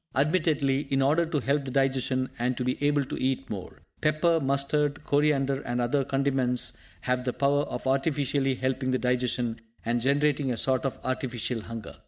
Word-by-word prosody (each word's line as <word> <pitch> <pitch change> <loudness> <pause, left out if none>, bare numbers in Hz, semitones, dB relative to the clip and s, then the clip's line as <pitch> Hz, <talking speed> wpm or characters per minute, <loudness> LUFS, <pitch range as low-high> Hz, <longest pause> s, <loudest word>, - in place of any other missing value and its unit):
Admittedly, 145 -2 +1
in 135 - +2
order 155 +5 +3
to 155 -2 0
help 140 +2 0
the 135 - -5
digestion, 130 -1 +1
and 125 +1 0
to - - -1
be 125 - +1
able 145 0 +3
to 130 - -5
eat 135 +1 0
more. 95 -4 -7 0.2
Pepper, 155 +2 +3
mustard, 145 +1 0
coriander 140 -2 +2
and 120 -2 -3
other 125 +3 +1
condiments 135 -2 0 0.3
have 125 0 0
the 125 - 0
power 140 +2 +2
of - - -6
artificially 135 0 +1
helping 130 0 -1
the 130 - +2
digestion, 125 -2 -1 0.2
and 120 +1 0
generating 140 +1 +2
a 120 - -2
sort 130 +2 +1
of 135 - -2
artificial 125 -2 -2
hunger. 115 -1 -8
135 Hz, 175 wpm, -27 LUFS, 125-145 Hz, 0.3 s, order